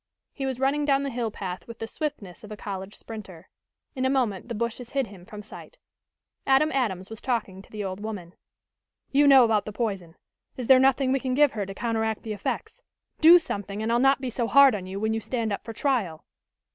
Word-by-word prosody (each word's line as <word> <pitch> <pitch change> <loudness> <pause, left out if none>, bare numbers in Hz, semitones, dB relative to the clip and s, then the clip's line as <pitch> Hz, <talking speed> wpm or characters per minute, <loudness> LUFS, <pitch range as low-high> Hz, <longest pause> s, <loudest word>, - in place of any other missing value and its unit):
He 270 -2 -3
was 260 -2 -3
running 275 +3 +1
down 280 -1 +2
the 275 - -3
hill 235 -2 -2
path 185 -4 -6
with 230 -1 -9
the 225 - -4
swiftness 225 - -6
of 210 - -11
a 210 - -7
college 195 -1 -6
sprinter. 190 -6 -10 0.5
In 260 - -2
a 260 - +2
moment 245 -6 -1
the 235 - -3
bushes 235 +2 -4
hid 275 -2 +1
him 195 -4 -14
from 210 -1 -9
sight. 360 - -12 0.7
Adam 270 +3 +4
Adams 210 -8 -2
was 225 - -8
talking 215 -7 -2
to - - -19
the 210 -1 -5
old 190 0 -4
woman. 205 -5 -6 0.8
"You 285 +1 +4
know 265 -3 +8
about 220 -2 +1
the 210 - -5
poison. 195 -6 -3 0.4
Is 250 - -4
there 260 +1 +7
nothing 265 0 +3
we 270 - +2
can 255 -1 -2
give 295 -1 +5
her 205 -3 -4
to 195 - -7
counteract 225 -1 -1
the 220 - -4
effects? 210 - -4 0.4
Do 330 +3 +9
something, 205 - -4
and 225 - -1
I'll 235 - +3
not 270 +1 +4
be 255 -2 -3
so 235 0 -1
hard 280 +1 +7
on 190 -3 -4
you 190 +1 -5
when 220 +1 0
you 225 - -1
stand 225 -1 -2
up 200 - -5
for 230 - -7
trial." 225 - -1
225 Hz, 225 wpm, -26 LUFS, 205-265 Hz, 0.8 s, Do